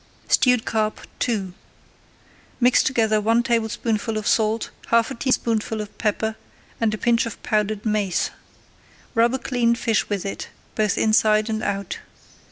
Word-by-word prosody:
STEWED 250 -3 +4
CARP 215 -1 -1 0.3
II 195 -6 -2 1.1
Mix 250 0 +5
together 220 -4 +2
one 230 +3 +3
tablespoonful 225 -2 -1
of 215 - -4
salt, 220 +1 +1 0.2
half 230 0 +3
a - - -2
teaspoonful 230 -3 0
of 210 -1 -6
pepper, 220 0 0 0.4
and 225 -2 +2
a 215 - -3
pinch 235 +1 +2
of 230 - -7
powdered 215 -1 0
mace. 210 -5 0 0.8
Rub 235 +1 +3
a - - 0
cleaned 240 -3 +1
fish 225 -3 0
with 200 -2 -2
it, 195 - -5 0.2
both 215 -2 +1
inside 215 0 +3
and 220 0 -2
out. 200 -1 -3
220 Hz, 145 wpm, -23 LUFS, 215-230 Hz, 1.1 s, Mix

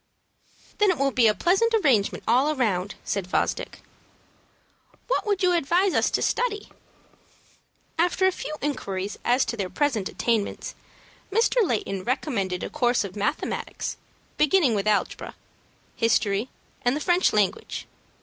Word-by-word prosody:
"Then 415 -1 +5
it 365 - +2
will 275 0 +1
be 245 -3 +4
a 215 - +3
pleasant 420 - +2
arrangement 255 - +2
all 265 +7 +3
round," 200 -7 0
said 200 -3 -2
Fosdick. - - -2 1.2
"What - - 0
would 405 -2 0
you 360 -1 +4
advise 350 +4 +2
us - - +2
to - - 0
study?" 440 -4 -1 1.3
After 360 +2 +2
a 375 - +4
few 305 -4 -6
inquiries 200 -9 -3
as 250 +2 +3
to 235 - -3
their 195 -4 -3
present 240 -9 0
attainments, 225 -4 -1 0.6
Mr. 455 +4 +2
Layton 205 - -2
recommended 215 - -2
a - - -4
course 245 -5 +1
of 200 -1 -7
mathematics, 210 +9 -3 0.4
beginning 300 -4 +4
with 205 0 -1
algebra, 210 -1 -1 0.6
history, 225 0 +1 0.3
and 245 +2 +1
the - - -2
French 355 +3 +2
language. 210 - -1
255 Hz, 140 wpm, -25 LUFS, -, 1.3 s, Then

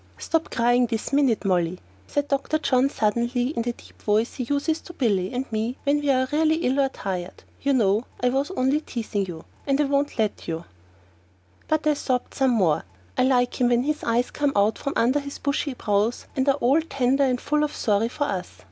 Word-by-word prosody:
"Stop 325 -1 -1
crying 245 +1 +3
this 225 +4 -3
minute, 265 -7 +2
Molly," 180 -2 +1 0.3
said 290 0 -1
Dr. 280 +2 0
John 265 -3 +2
suddenly 240 +2 0
in 255 -6 -2
the 240 +1 -1
deep - - -18
voice 215 +3 +1
he 250 - -4
uses 285 +5 0
to 345 - -11
Billy 200 - 0
and 255 +1 -2
me 225 +3 -2
when 285 +1 +2
we 290 -1 -1
are 260 -1 +3
really 315 +1 +3
ill 275 -4 0
or 270 -1 +3
tired. 185 -7 -5 0.2
"You 280 0 +2
know 215 -2 +2
I 250 - +2
was 270 +3 0
only 265 +4 +2
teasing 215 -8 -3
you 165 -2 -8 0.2
and 275 0 +2
I - - +4
won't 280 0 0
let 215 -3 -1
you 165 0 -4 0.5
" 90 +1 -34
But 310 0 0
I 305 - +4
sobbed 255 -3 -2
some 265 -1 +2
more. 185 -11 +2 0.3
I - - +1
like 250 -1 +1
him 245 - +4
when 240 0 +3
his 300 +2 -2
eyes 235 +2 +1
come 290 -1 0
out 205 +2 +2
from 275 - -3
under 255 +5 +3
his 280 0 -7
bushy 280 -1 -1
brows 210 +1 0
and 265 +1 +2
are 275 - +4
all 280 +3 +3
tender 275 -3 +1
and 250 -2 +1
full 300 +3 +1
of 300 - 0
sorry 215 +1 +1
for 290 - -2
us. 185 - -4
250 Hz, 215 wpm, -24 LUFS, 215-280 Hz, 0.5 s, I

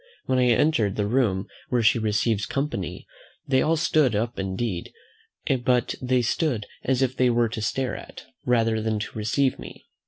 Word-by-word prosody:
When 130 -1 +1
I 125 - +4
entered 115 -5 +2
the 105 - 0
room 105 -4 +1 0.2
where 120 -2 +1
she 115 +2 +4
receives 110 0 0
company, 135 - -3 0.4
they 130 -1 +3
all 165 - +2
stood 155 - +2
up 115 +2 -2
indeed; 95 -1 -3 0.7
but 125 -1 +2
they 125 -1 +1
stood 120 -3 0 0.2
as 130 0 +1
if 130 0 -1
they 125 -1 +3
were 120 -1 +2
to 110 - -5
stare 130 +4 -1
at, - - -10 0.2
rather 115 -2 +2
than 110 0 -1
to 105 - -5
receive 120 +5 0
me. - - -11
120 Hz, 175 wpm, -25 LUFS, 110-130 Hz, 0.7 s, I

